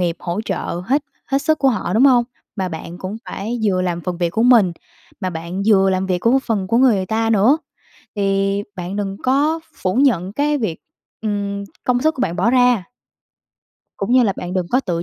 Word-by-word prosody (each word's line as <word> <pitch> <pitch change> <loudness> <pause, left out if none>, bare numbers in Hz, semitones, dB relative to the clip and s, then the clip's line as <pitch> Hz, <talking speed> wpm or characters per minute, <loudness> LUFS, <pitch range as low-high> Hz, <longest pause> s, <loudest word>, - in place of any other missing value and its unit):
nghiệp 175 -1 0
hỗ 175 +3 -3
trợ 180 -3 -3
hết 280 +4 +2 0.2
hết 275 - +1
sức 315 -1 +2
của 275 - +3
họ, 190 -7 -1
đúng 235 +5 +5
hông? 250 -3 +5 0.3
Mà 190 -1 -1
bạn 170 +1 -7
cũng 190 +3 -5
phải 225 +5 -4
vừa 185 -3 +2
làm 175 -1 -2
phần 180 0 -4
việc 170 -1 0
của 225 - 0
mình, 235 -8 +5 0.5
mà 185 -2 -2
bạn 170 +4 -5
vừa 195 -3 +5
làm 190 0 0
việc 180 -1 0
của 235 +7 +3
phần 210 -5 -1
của 230 - +1
người 220 -8 +3
ta 225 +2 0
nữa, 225 +8 +4 0.6
thì 195 0 +1
bạn 180 +2 -5
đừng 195 -1 -3
có 290 +5 +2
phủ 185 0 -2
nhận 235 -9 +2
cái 295 +4 +1
việc, 215 -10 -2 0.4
ừm, 200 -2 -2 0.2
công 250 0 +1
sức 315 +1 +2
của - - -6
bạn 175 -9 -1
bỏ 195 +7 +2
ra. 245 -5 +3 1.1
Cũng 200 +5 -2
như 255 -1 +6
là 205 - +2
bạn 180 +1 -5
đừng 185 -2 0
có 255 - +3
tự 170 -9 -2
200 Hz, 210 wpm, -19 LUFS, 185-245 Hz, 1.1 s, như